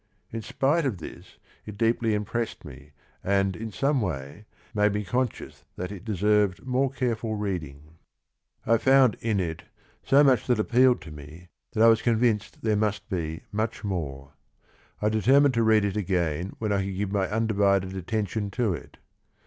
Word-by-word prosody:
In 115 - -4
spite 140 +8 +1
of 130 -9 -1
this, 80 - -11 0.3
it 105 -1 -8
deeply 115 0 +1
impressed 105 -2 -3
me 70 0 -12 0.3
and 95 -1 +1
in 110 0 -6
some 140 +5 +1
way 75 0 -5 0.3
made 105 -1 +2
me 105 - -1
conscious 125 +4 -3
that 90 +2 -5
it 95 -3 -8
deserved 105 -1 +1
more 130 +1 +1
careful 120 -4 -2
reading. 80 -6 -5 0.7
I 115 0 +3
found 130 -3 +5
in 110 -3 0
it 80 -3 -3 0.4
so 140 +2 +5
much 130 -4 +3
that 125 -2 +3
appealed 125 +3 +3
to 80 -4 -10
me 75 +4 -12 0.2
that 110 - +3
I - - +8
was 115 -1 +5
convinced 115 -3 0
there 110 -1 +2
must 105 0 -1
be 80 -4 -3
much 110 +3 -2
more. 70 -9 -4 0.7
I 105 - +3
determined 130 +6 +4
to 115 - +1
read 110 -2 +4
it 100 - -2
again 90 -3 -1
when 110 -2 -2
I 100 -1 +1
could 95 -1 -4
give 100 -1 -2
my 100 -2 0
undivided 100 -3 +1
attention 100 +2 -2
to 115 -6 +1
it. 80 - -9
105 Hz, 170 wpm, -26 LUFS, 90-115 Hz, 0.7 s, I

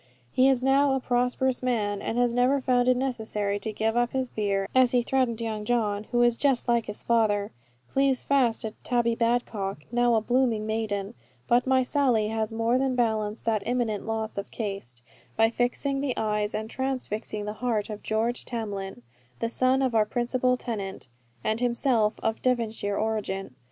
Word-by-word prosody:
He 260 +1 +4
is 255 -2 +2
now 275 +1 +4
a - - 0
prosperous 250 +1 0
man; 210 -5 -1
and 230 - -3
has 245 -1 +2
never 250 +3 +3
found 250 -1 +2
it 255 -1 +4
necessary 220 -6 -2
to 220 - -4
give 220 +1 -1
up 240 0 +1
his 260 -1 -1
beer, 200 -2 -1
as 255 -1 +4
he 245 -1 +3
threatened 250 -3 0
Young 220 -2 -3
John, 210 -2 0
who 240 +2 +1
is 240 -1 +4
just 270 -1 +1
like 235 -1 +2
his 210 - -5
father, 215 -3 +1 0.4
cleaves 270 - +1
fast 260 -5 +2
to 220 - -3
Tabby 235 -1 +1
Badcock, 225 -7 -1
now 240 -1 +3
a 220 - +2
blooming 240 -2 +1
maiden; 215 -3 -2 0.3
but 245 +2 +3
my 260 0 +4
Sally 250 -6 +1
has 220 0 -2
more 230 +3 +1
than 265 -1 0
balanced 220 -3 -1
that 220 -2 +1
imminent 230 -4 -1
loss 220 -2 -2
of 200 - -6
caste, 195 - -6 0.3
by 225 +1 +4
fixing 270 +3 0
the 275 -3 -2
eyes 210 -1 -1
and 220 0 -3
transfixing 225 -5 -3
the 210 - -3
heart 225 -4 -1
of 210 - -7
George 225 +3 -1
Tamlin, 200 - -5 0.3
the 230 - -2
son 260 +2 +2
of 255 -2 0
our 220 -1 +4
principal 250 +2 +1
tenant, 200 - -5 0.3
and 220 +1 0
himself 235 -3 +1
of 225 0 -1
Devonshire 225 -5 0
origin. 205 -6 -2
230 Hz, 180 wpm, -26 LUFS, 215-250 Hz, 0.4 s, He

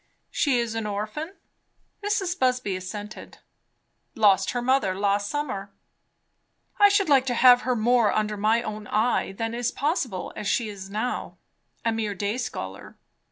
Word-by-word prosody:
"She 275 -5 +2
is 235 -2 -1
an 225 -1 -3
orphan?" 215 - -4 0.7
Mrs. 385 -3 -1
Busby 255 -6 +1
assented. 205 +3 -8 0.8
"Lost 195 -4 +4
her 245 - -1
mother 260 -7 +2
last 200 +1 0
summer." 255 -10 -3 1.1
"I 410 0 +8
should 400 -1 +2
like 270 -3 +4
to 245 - 0
have 245 0 +7
her 255 -1 0
more 235 -1 +3
under 215 0 0
my 220 +3 +2
own 210 -2 -6
eye 220 -1 +1
than 225 +3 -3
is 240 0 -1
possible 280 - -2
as 210 - -5
she 230 -1 0
is 195 -2 -8
now; 215 +5 -3 0.5
a 230 - +3
mere 220 -2 -2
day 205 +5 -2
scholar. 95 - -6
225 Hz, 155 wpm, -25 LUFS, 205-255 Hz, 1.1 s, I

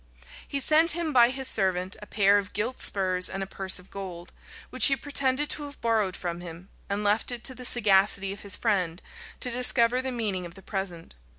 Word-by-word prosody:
He 280 - -3
sent 315 +4 +4
him 335 -2 -3
by 240 -2 +6
his 265 0 -3
servant 190 -3 0
a 210 - -10
pair 205 0 +3
of 200 0 -8
gilt 235 +5 -3
spurs 185 -2 +1
and 195 0 -4
a - - -4
purse 190 0 0
of 180 +1 -9
gold, 180 -3 -8 0.4
which - - +6
he 275 - +2
pretended 275 0 0
to 295 - -4
have 285 0 -11
borrowed 220 -5 0
from 175 -2 -5
him; 175 +2 -10 0.2
and 200 +1 -2
left 210 +4 +2
it 240 -1 -6
to 260 - -1
the 250 0 -7
sagacity 195 -4 +3
of 205 - -12
his 200 -2 -1
friend 185 -6 -1 0.4
to 250 - +1
discover 245 0 +3
the 260 0 -4
meaning 210 -7 -3
of 170 - -16
the 195 - -14
present. 185 -4 -6
205 Hz, 210 wpm, -26 LUFS, 190-250 Hz, 0.4 s, by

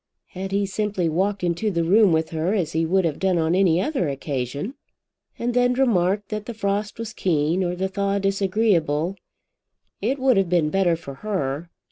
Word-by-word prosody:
Had 190 +1 -6
he 200 +1 +1
simply 195 -2 -1
walked 190 +4 0
into 175 +5 0
the 170 -4 0
room 200 +3 +5
with 160 0 +1
her 165 +5 0
as 170 -6 -1
he 160 0 0
would 190 +1 +2
have 155 -3 -2
done 190 -2 +2
on 160 0 +1
any 180 -3 +3
other 195 - 0
occasion, 140 - -3 0.6
and 240 +1 -2
then 245 0 +3
remarked 205 -6 +1
that 215 -1 -4
the 235 - -5
frost 205 0 -2
was 225 -1 -6
keen 165 0 +1
or 175 0 -1
the 190 +2 -1
thaw 200 +1 -1
disagreeable, 195 -4 +1 0.9
it 245 +7 0
would 260 -4 +3
have 195 -3 +2
been 165 -4 +2
better 190 -3 +2
for 140 -4 -9
her. 170 -6 -2
190 Hz, 185 wpm, -23 LUFS, 165-205 Hz, 0.9 s, room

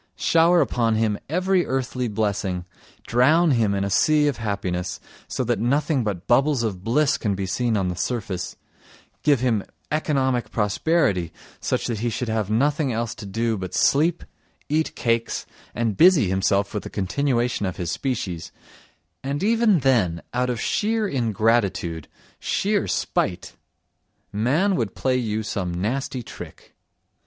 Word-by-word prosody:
Shower 170 +1 +4
upon 115 -2 +1
him 110 -2 0
every 185 +3 +2
earthly 130 -1 -2
blessing, 100 -4 -2 0.4
drown 155 +8 +4
him 110 -6 +2
in 100 - 0
a 100 - -2
sea 150 +8 +4
of 145 - -1
happiness, 95 -5 -3 0.3
so - - -2
that 120 -1 0
nothing 140 +3 +1
but 100 -5 -3
bubbles 135 +1 +3
of 95 -5 -3
bliss 135 +7 +2
can 105 -3 -1
be 95 0 -3
seen 115 +3 0
on 95 -2 0
the 90 - -2
surface; 95 -4 -3 0.7
give 145 -5 +3
him 115 -6 +1 0.3
economic 135 -5 0
prosperity, 105 - +1 0.3
such - - -1
that 115 -3 -2
he 120 +2 0
should 120 +1 -3
have 110 -3 -1
nothing 140 +5 +1
else 115 -1 -2
to 105 - -9
do 115 +2 -1
but 95 -1 -5
sleep, 160 +4 +2 0.5
eat 155 +2 0
cakes 115 -1 -1 0.3
and 115 -4 -1
busy 165 - +6
himself 100 +1 +1
with 105 - -2
the - - -8
continuation 120 +1 0
of 95 - -5
his 90 -3 -3
species, 100 -11 -3 0.7
and 140 +5 -2
even 220 -5 +3
then 105 -11 +2
out 125 +1 0
of 120 -3 -2
sheer 215 - 0
ingratitude, 110 - 0 0.3
sheer 205 0 0
spite, - - -1 0.8
man 145 - +2
would 110 - -2
play 130 -1 0
you 110 -3 -1
some 100 -5 -3
nasty 120 +8 -2
trick. - - -11
115 Hz, 150 wpm, -23 LUFS, 100-140 Hz, 0.8 s, busy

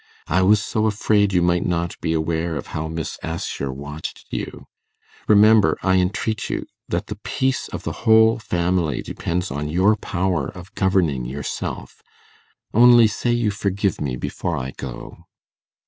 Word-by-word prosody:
I 90 +5 +1
was 105 +3 +5
so 110 +1 0
afraid 105 -1 +2
you 90 -2 +2
might 85 0 +2
not 85 0 -1
be 80 - -1
aware 80 0 -1
how 75 +3 -5
Miss 80 -1 -5
Assher 80 -4 -4
watched 70 +3 -7
you. - - -5 0.6
Remember, 105 0 +5
I 95 -1 +3
entreat 100 +3 -1
you, - - -3 0.2
that - - -1
the - - -7
peace 130 -1 -1
of - - -7
the - - -3
whole 110 +1 +5
family 85 - 0
depends 90 +3 -3
on 75 +2 -3
your 95 +7 +3
power 90 -7 -1
of 90 +2 -11
governing 85 -10 +1
yourself. 70 +4 -5 0.7
Only 120 +1 +7
say 110 +3 -1
you 120 -3 +1
forgive 100 -1 -1
me 70 -4 -2
before - - -3
I 65 +1 -4
go. 65 -3 -9
90 Hz, 150 wpm, -22 LUFS, 80-105 Hz, 0.7 s, Only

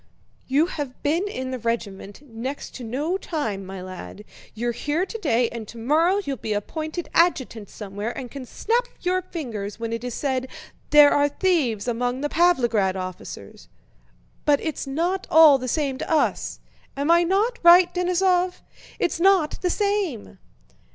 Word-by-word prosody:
"You 280 +5 +3
have 290 -7 -6
been 330 +7 +1
in 260 -9 -5
the 255 - -4
regiment 210 -1 -4
next 255 +4 -6
to 255 - -8
no 290 +11 -2
time, 285 - -3
my 190 -1 -8
lad, 185 +2 -9 0.3
you're 240 +2 -1
here 295 +9 -1
today 285 - 0
and 225 -2 -7
tomorrow 305 - +1
you'll 275 -1 -3
be 215 - -3
appointed 315 - -4
adjutant 260 - +1
somewhere 205 +1 -5
and 250 -3 -6
can 270 -3 -8
snap 475 - 0
your 365 +1 +1
fingers 230 - -6
when 230 0 -3
it 230 +1 -4
is 245 -2 -4
said 260 -2 -1 0.4
'There 295 -1 +8
are 290 0 +3
thieves 285 - 0
among 245 +2 -1
the 295 - -1
Pávlograd 240 - +2
officers!' 185 -1 -8 0.8
But 290 -1 +3
it's 310 -3 -4
not 345 +7 -1
all 310 -4 +7
the 255 - -5
same 275 0 -1
to - - -5
us! 315 - 0 0.4
Am 285 +4 +1
I 340 0 +6
not 415 +8 +1
right, 350 +1 +7
Denísov? 360 0 +1 0.4
It's 335 - -1
not 370 -4 +3
the 360 - +1
same!" 380 - -2
285 Hz, 160 wpm, -24 LUFS, 230-345 Hz, 0.8 s, There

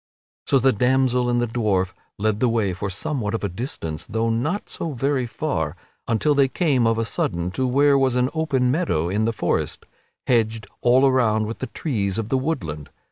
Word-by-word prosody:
So 135 - +4
the 130 0 +3
damsel 125 +1 +2
and 120 0 +2
the 120 - +2
dwarf 105 -6 0 0.2
led 105 0 0
the 125 - +3
way 110 -5 +1
for 95 +3 -4
somewhat 105 +2 -2
of 115 - -4
a - - +1
distance, 90 - -5
though 115 +1 0
not 150 - -1
for - - -16
so 165 -3 -4
very 135 0 0
far, 115 - -2 0.3
until 130 +7 +2
they 140 -1 +4
came 130 -4 +1
of 115 0 +2
a 115 - 0
sudden 85 -5 -1
to 130 +7 -1
where 140 +2 +4
was 130 -2 +2
an 125 +1 +1
open 140 -6 +1
meadow 105 - 0
in 105 +4 0
the 115 - +1
forest, 110 - -2 0.4
hedged 110 -3 +1 0.2
all 125 +3 +5
around 115 -5 +3
with 110 +2 -6
the 130 - -3
trees 105 - -2
of 110 -1 -3
the 135 - +2
woodland. 85 - -3
120 Hz, 200 wpm, -23 LUFS, 105-135 Hz, 0.4 s, all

